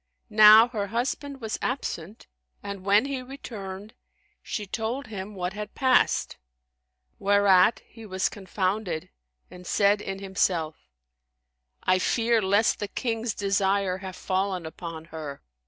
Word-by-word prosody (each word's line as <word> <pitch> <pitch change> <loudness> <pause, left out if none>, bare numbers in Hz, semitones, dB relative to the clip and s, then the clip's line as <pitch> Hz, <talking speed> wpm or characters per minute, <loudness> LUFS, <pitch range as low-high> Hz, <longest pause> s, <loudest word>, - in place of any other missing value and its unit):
Now 215 +2 +9
her 210 -4 -3
husband 265 +5 -3
was 220 -1 -3
absent 215 - -4 0.4
and 200 -2 -6
when 205 +5 +4
he 275 -2 -3
returned, 215 -6 -8 0.5
she 210 - -4
told 225 +7 -3
him 205 -1 -7
what 180 0 -3
had 210 0 -7
passed, 260 -2 +2 0.8
whereat 200 0 +4
he 225 -2 -13
was 190 -1 0
confounded 190 -3 -3 0.4
and 180 0 -11
said 205 0 +3
in 195 -1 -5
himself, 175 - -1 0.9
"I 185 - +3
fear 230 +2 +2
lest 205 +3 +2
the 205 - -3
King's 225 0 -2
desire 195 -1 +1
have 190 -1 -7
fallen 185 -2 -2
upon 160 0 -7
her." 150 -3 -7
200 Hz, 125 wpm, -26 LUFS, 185-220 Hz, 0.9 s, Now